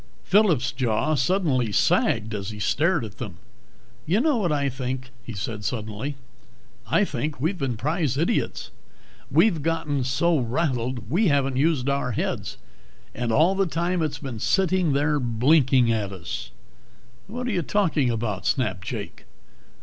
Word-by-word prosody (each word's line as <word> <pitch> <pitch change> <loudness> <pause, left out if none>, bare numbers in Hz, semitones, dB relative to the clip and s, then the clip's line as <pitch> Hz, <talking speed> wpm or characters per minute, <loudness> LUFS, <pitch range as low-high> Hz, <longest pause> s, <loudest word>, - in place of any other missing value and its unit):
Phillip's 175 - +3
jaw 130 +4 0
suddenly 135 - +1
sagged 110 +2 +2
as 100 -1 -4
he 105 - -7
stared 150 - +1
at 110 +1 -11
them. 100 -9 -6 0.7
"You 185 +7 +3
know 295 0 +2
what 185 -7 0
I 140 -2 +1
think?" 130 -1 -4
he 120 - -7
said 105 +1 -5
suddenly. 110 +6 -3 0.7
"I 205 - +3
think 150 -6 -3
we've 170 +7 -1
been 130 -4 -2
prize 150 - 0
idiots. 170 +10 -1 0.6
We've 175 -9 +3
gotten 150 -3 -1
so 145 +6 +2
rattled 125 -3 -2
we 200 +7 +3
haven't 135 -3 +1
used 145 -2 +2
our 140 -3 0
heads. - - -3 0.6
And 120 0 -2
all 160 +10 +4
the 195 -1 +1
time 170 +2 -1
it's 150 -2 -1
been 130 -5 -6
sitting 185 - +2
there 150 +1 +2
blinking 125 0 +3
at 105 -3 -1
us!" 90 -4 -6 0.8
"What 245 +4 -5
are 245 - -1
you 185 -4 0
talking 165 -7 +1
about?" 110 -4 -2
snapped 105 -7 -1
Jake. 110 -4 -6
135 Hz, 150 wpm, -24 LUFS, 120-165 Hz, 0.8 s, all